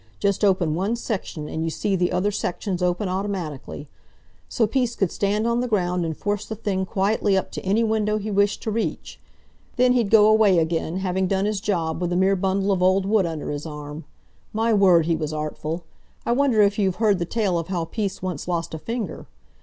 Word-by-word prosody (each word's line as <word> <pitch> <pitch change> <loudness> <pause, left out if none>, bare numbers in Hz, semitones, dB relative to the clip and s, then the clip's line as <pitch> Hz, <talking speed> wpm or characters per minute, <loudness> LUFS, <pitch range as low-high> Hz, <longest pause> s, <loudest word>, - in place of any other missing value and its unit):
Just 200 0 0
open 185 -6 +3
one 195 +8 0
section, 190 -9 -4
and 160 - -3
you 165 - 0
see 195 +4 -1
the 180 -1 +1
other 185 +3 +1
sections 185 -1 -3
open 180 +3 0
automatically; 180 -7 -4 0.6
so 230 - +2
Peace 240 +1 0
could 195 -4 0
stand 205 +2 0
on 235 0 +1
the 250 - -1
ground 180 -5 0
and 160 -2 -4
force 205 0 -2
the 220 - -6
thing 195 -3 -2
quietly 200 0 +1
up 190 - -2
to - - -5
any 205 +4 +2
window 215 -1 +1
he 215 0 -4
wished 200 +1 +1
to 220 - -2
reach. 225 +1 -3 0.6
Then 250 0 +4
he'd 235 -5 +1
go 215 -1 +7
away 215 -3 +5
again, 165 +1 0
having 190 0 0
done 195 +1 0
his 210 -2 -1
job, 170 -6 -1
with 175 -1 -1
a - - 0
mere 190 +1 +3
bundle 195 +1 0
of 190 -2 +1
old 185 +1 +3
wood 200 -3 +2
under 160 -3 -4
his 145 +2 -5
arm! 150 0 -8 0.5
My 225 +1 +1
word, 185 -5 +5
he 165 0 +1
was 155 -1 -3
artful! 155 +2 -4 0.4
I - - 0
wonder 245 -4 +4
if 200 +1 +2
you've 190 -3 +1
heard 210 -2 +2
the 170 - -1
tale 195 -3 0
of 165 - -5
how 175 -3 -2
Peace 195 +1 -4
once 180 -5 -4
lost 170 -2 -2
a 160 - -4
finger. 230 +5 -5
195 Hz, 215 wpm, -23 LUFS, 175-210 Hz, 0.6 s, go